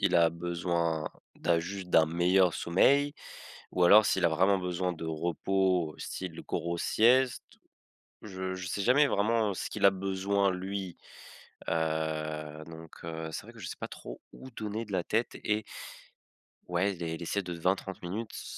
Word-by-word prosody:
a 85 -1 +6
besoin 85 -2 -1 0.3
d'un 85 -1 +1
juste 90 +2 -6
d'un 80 -2 +6
meilleur 90 +2 +3
sommeil 140 +12 +3 0.6
ou 90 - +1
alors 105 +4 +8
s'il 95 -2 +2
a - - +4
vraiment 95 +5 +3
besoin 90 0 -1
de 80 -1 -7
repos, 85 +1 0
style 90 -3 -6
grosse 85 0 -2
sieste. 125 +3 +3 0.8
Je 95 -2 -4
je 90 0 -6
sais 100 - -3
jamais 135 +7 +5
vraiment 110 0 +2
ce - - -4
qu'il - - -4
a 100 - +9
besoin, 95 +1 0
lui, 95 0 -4 0.7
heu, 80 -1 -2
donc, 80 0 -11
heu, 80 -1 -5
c'est - - -5
vrai - - -12
que - - -14
je - - -6
sais - - -5
pas - - -5
trop - - -9
où 130 - -11
donner 110 0 -4
de 105 - -9
la 90 -2 +1
tête 115 +6 0
et 105 0 -1 1.1
ouais, 90 +3 +1
les 85 -2 -6
s 80 - -5
les 85 - -6
siestes 100 +2 -2
de 90 - -3
20-30 95 +2 -1
minutes, 105 +6 -5
c - - -6
90 Hz, 170 wpm, -30 LUFS, 85-100 Hz, 1.1 s, a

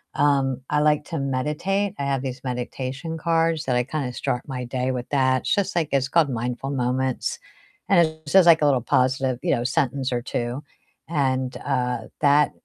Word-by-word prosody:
Um, 140 -3 +2
I 150 - +3
like 150 0 +3
to 165 -3 -4
meditate, 150 +9 -1
I - - -1
have 135 -1 -1
these 130 -1 -5
meditation 130 +5 -4
cards 165 -1 +1
that 130 - 0
I 125 - +2
kinda 135 -1 -3
start 125 0 -2
my 130 -2 -4
day 125 +1 -2
with 125 -1 -4
that, 130 -2 +2
it's - - +1
just, 200 0 -1
like 165 -4 +1
it's 135 -1 +1
called 160 +2 +3
Mindful 125 +2 -3
Moments, 130 0 -1 0.5
and 175 -4 +5
it 160 0 -11
says, 185 +3 +5
like, 165 -2 +7
a - - +5
little 135 -4 +3
positive, 130 +1 +1
you - - +1
know, 120 - -2
sentence 135 -1 0
or 120 -1 -1
2, 120 +3 -3 0.4
and, 130 -5 0
uh, 125 -1 0 0.2
that 145 0 +4
135 Hz, 190 wpm, -23 LUFS, 125-150 Hz, 0.5 s, like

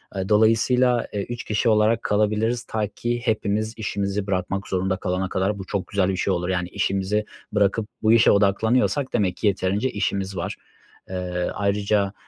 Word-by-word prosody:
Eee, 95 +1 -3
dolayısıyla, 115 +3 +3
eee, 100 - -1
3 120 0 -5
kişi 110 +2 0
olarak 110 +1 +3
kalabiliriz 110 +3 +1
ta 110 -3 -2
ki 120 +3 -3
hepimiz 110 -1 0
işimizi 100 -2 -2
bırakmak 95 0 -2
zorunda 95 0 -1
kalana 90 +1 -2
kadar 100 +2 -1
bu 95 - -6
çok 95 0 -3
güzel 100 -1 +1
bir 95 - -1
şey 95 - +1
olur, 90 +1 -2
yani, 90 -1 -1
işimizi 100 +3 -1 0.3
bırakıp 105 +1 +1 0.2
bu 110 +1 +5
işe 115 - +6
odaklanıyorsak 110 +7 +2
demek 90 -3 +1
ki 105 - 0
yeterince 100 +5 0
işimiz 100 -2 -2
var. 85 - -3 0.5
Eee, 90 -1 -2
ayrıca, 100 0 0
100 Hz, 165 wpm, -23 LUFS, 95-110 Hz, 0.5 s, işe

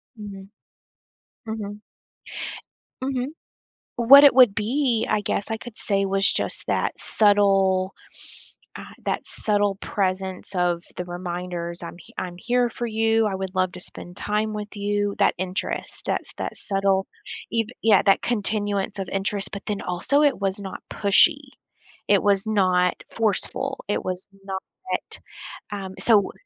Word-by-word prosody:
Mhm. 200 -2 -9 1.0
Mhm. 210 -1 -5 1.2
Mhm. 260 -1 -1 0.7
What 275 +5 +9
it 280 - +8
would 245 -6 +7
be, 235 +1 +1
I 210 - +2
guess 205 +1 -2
I 225 - 0
could 225 0 -11
say 195 -1 +1
was 195 +1 +3
just - - -2
that - - 0
subtle, 195 -2 +3 0.8
uh - - -8 0.2
that - - -2
subtle 205 -2 +1
presence 190 -1 -2
of 175 -1 +1
the 180 - -3
reminders, 175 -1 -5
"I'm 170 - -7
he - - -16
I'm 175 -1 -4
here 245 +2 +1
for 240 - -4
you. 225 0 +2
I 195 - -1
would 190 0 -4
love 185 -1 +1
to 180 - -8
spend 175 +1 -7
time 215 +1 -1
with 210 0 -6
you." 205 0 -1
That 200 - +3
interest, 185 +1 -2
that's - - -2
that - - -5
subtle 195 -1 +1 0.4
eve 225 -1 0
Yeah, 215 -3 +5
that 195 - +3
continuance 205 -3 -1
of 190 - -4
interest 195 +1 -1
but 200 - -6
then 205 -2 -2
also 220 +12 +1
it 285 -7 +3
was 195 0 -1
not 190 -1 -7
pushy. 275 +8 +4 0.6
It 200 -2 +4
was 200 0 +2
not 185 -4 +2 0.2
forceful. 225 +5 -1
It 205 - -1
was 185 +1 -3 0.2
not, 190 -1 -4 1.1
um 195 -2 -5
so, 210 -4 +4
200 Hz, 145 wpm, -24 LUFS, 190-220 Hz, 1.2 s, What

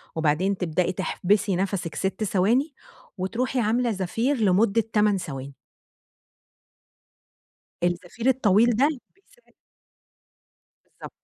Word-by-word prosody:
وبعدين 165 +5 +1
تبدئي 175 0 0
تحبسي 195 +1 0
نَفَسِك 185 -4 -2
6 190 +2 -2
ثواني، 230 - +1 0.4
وتروحي 240 +7 -2
عاملة 235 +2 +1
زفير 225 +8 -1
لمدة 210 +2 +3
8 210 -2 +3
ثواني. 140 -5 -7 2.3
الزفير 180 +7 -2
الطويل 235 -2 +3
ده 270 +6 +4 0.3
بيساعد 485 +5 -29 1.3
بالضبط. - - -12
200 Hz, 90 wpm, -24 LUFS, 180-235 Hz, 2.3 s, ده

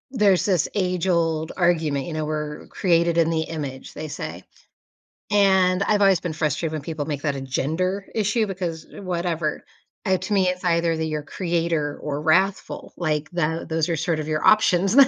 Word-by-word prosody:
There's 210 -8 +3
this 185 -7 +2
age-old 170 -4 0
argument, 160 -6 +1
you 170 - -5
know, 155 0 -2
we're 150 -1 -4
created 170 -2 +2
in 165 -1 +4
the 160 -1 +1
image, 145 -5 -6
they 155 - -6
say, 145 - -6 0.9
and 190 -2 +4
I've 205 0 +2
always 195 -3 +5
been 170 -2 -4
frustrated 155 +1 -1
when 155 -1 -3
people 155 0 -4
make 145 -2 -4
that 145 -2 0
a 135 - -4
gender 170 +9 -1
issue 215 +1 +1
because 175 -5 -4
whatever. 170 -4 -2 0.4
Uh, 190 0 +3
to 210 - -3
me 190 -2 +3
it's 180 0 -2
either 170 -1 +2
that 160 0 -2
you're 155 -1 -3
creator 165 -3 -1
or 145 -1 -3
wrathful, 185 +5 +1
like, 155 -3 -1
that 165 -2 -1
those 160 0 0
are 170 - +1
sort 160 0 -1
of 155 - -4
your 155 0 -1
options. 195 -2 +4
165 Hz, 180 wpm, -23 LUFS, 155-185 Hz, 0.9 s, always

